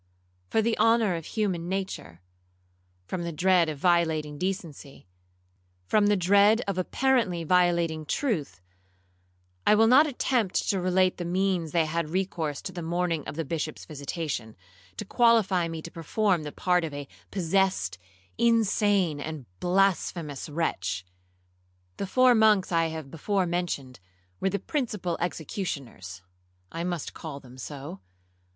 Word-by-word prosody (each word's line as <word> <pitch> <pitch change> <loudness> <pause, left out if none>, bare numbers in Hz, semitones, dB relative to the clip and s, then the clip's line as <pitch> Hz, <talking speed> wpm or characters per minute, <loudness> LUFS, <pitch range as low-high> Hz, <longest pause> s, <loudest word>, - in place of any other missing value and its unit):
For 220 - +2
the 230 0 +1
honour 225 -4 +4
of 165 -2 -6
human 185 -6 -2
nature,—from 90 - -8
the 170 0 -3
dread 175 +1 +3
of 150 - -4
violating 160 -3 +1
decency,—from 90 - -4
the 205 0 +3
dread 200 +5 +5
of 195 -2 -1
apparently 215 -4 +1
violating 170 -2 +2
truth, 155 - -2 1.1
I - - +7
will 220 +1 +5
not 265 +7 +6
attempt 245 -7 0
to 195 -2 +1
relate 185 0 +2
the 175 - -4
means 180 -2 0
they 165 -2 +2
had 160 0 -2
recourse 165 -5 -2
to - - -5
the 175 - -6
morning 170 -1 -1
of - - -5
the 165 0 -3
Bishop's 155 +1 -4
visitation, 140 -6 -5 0.4
to - - -4
qualify 210 -6 +3
me 165 -1 -6
to 170 - -8
perform 180 +2 0
the 150 -1 -6
part 180 +1 +1
of 155 -3 -4
a 145 -1 -6 0.2
possessed, 180 - 0 0.4
insane, 205 -8 +2
and 150 -2 -6
blasphemous 175 -6 0
wretch. 100 - -2 0.9
The 195 - -3
four 255 +4 +5
monks 215 -5 +4
I 165 -1 +2
have 160 -4 -7
before 190 +4 0
mentioned, 170 - -3 0.4
were 195 - +1
the 200 - -1
principal 210 - -2
executioners, 140 - -5 0.5
(I 165 - -4
must 175 -3 -3
call 150 -4 -7
them 130 -1 -14
so). 135 -6 -7
170 Hz, 135 wpm, -27 LUFS, 145-195 Hz, 1.1 s, I